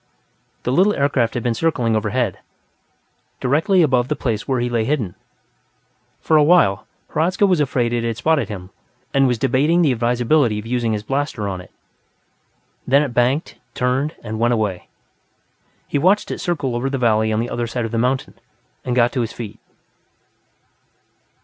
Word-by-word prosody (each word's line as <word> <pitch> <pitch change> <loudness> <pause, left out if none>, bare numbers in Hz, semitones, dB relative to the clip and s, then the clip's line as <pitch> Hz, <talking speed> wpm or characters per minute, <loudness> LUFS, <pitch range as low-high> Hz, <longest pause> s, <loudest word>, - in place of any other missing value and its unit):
The 125 - -1
little 195 +9 +3
aircraft 140 -5 +1
had 120 - -2
been 120 - +1
circling 125 -5 0
overhead, 110 -1 -1 1.0
directly 165 +8 +2
above 130 -4 +2
the 150 - -1
place 115 -6 -3
where 130 -2 0
he 120 - 0
lay 120 -2 0
hidden. 115 -8 -1 1.1
For 160 - +2
a 150 - +5
while, 145 - +3 0.2
Hradzka 180 +6 +1
was 185 -4 +2
afraid 125 -4 0
it 120 -1 0
had 115 -1 -2
spotted 140 -3 +1
him, 95 -3 -8 0.4
and 135 -1 +4
was 125 -2 +1
debating 145 +8 +2
the 145 - +3
advisability 120 +1 +1
of 105 - -6
using 120 -1 -1
his 105 -1 -3
blaster 135 -4 -2
on 95 -2 -4
it. - - -15 1.2
Then 140 +3 +4
it 135 -5 -4
banked, 125 +6 0 0.2
turned 130 +5 0
and 110 -1 -5
went 120 +1 +2
away. 105 -5 -2 1.0
He 145 - -1
watched 190 +7 +2
it - - -4
circle 145 -8 -2
over 125 +3 -1
the 135 - -2
valley 110 -3 +2
on 110 - 0
the 120 +2 -3
other 120 0 -2
side 120 0 -3
of 110 - -5
the 115 - -1
mountain, 130 +2 -1 0.5
and 125 - -2
got 120 -1 +3
to 130 - -1
his 115 -1 -3
feet. 115 -4 -8
125 Hz, 175 wpm, -20 LUFS, 115-145 Hz, 1.2 s, a